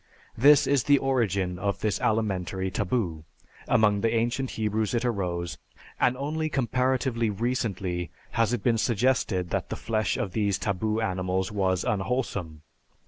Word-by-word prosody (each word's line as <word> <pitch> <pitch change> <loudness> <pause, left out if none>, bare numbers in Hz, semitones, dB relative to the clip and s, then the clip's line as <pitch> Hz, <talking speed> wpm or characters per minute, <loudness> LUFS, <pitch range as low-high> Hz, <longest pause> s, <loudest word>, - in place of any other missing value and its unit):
This 145 +4 +6
is 140 -5 +2
the 145 -1 +5
origin 100 -10 0
of 100 -1 -2
this 105 -2 0
alimentary 95 -4 0
taboo; 90 -6 -1 0.4
among 105 -2 +3
the 115 - +2
ancient 120 +3 0
Hebrews 110 +1 0
it 120 +1 0
arose, 90 -7 -2 0.4
and 125 +1 +2
only 155 +3 -2
comparatively 130 -3 0
recently 100 -6 -2 0.2
has 115 0 +1
it 120 -5 -2
been 115 -2 +2
suggested 110 -6 +1
that - - -2
the - - -3
flesh 110 -1 -1
of 95 - -2
these 100 -1 0
taboo 110 +2 -1
animals 95 -2 -1
was 95 -3 0
unwholesome. 95 -7 -2
110 Hz, 140 wpm, -27 LUFS, 95-120 Hz, 0.4 s, This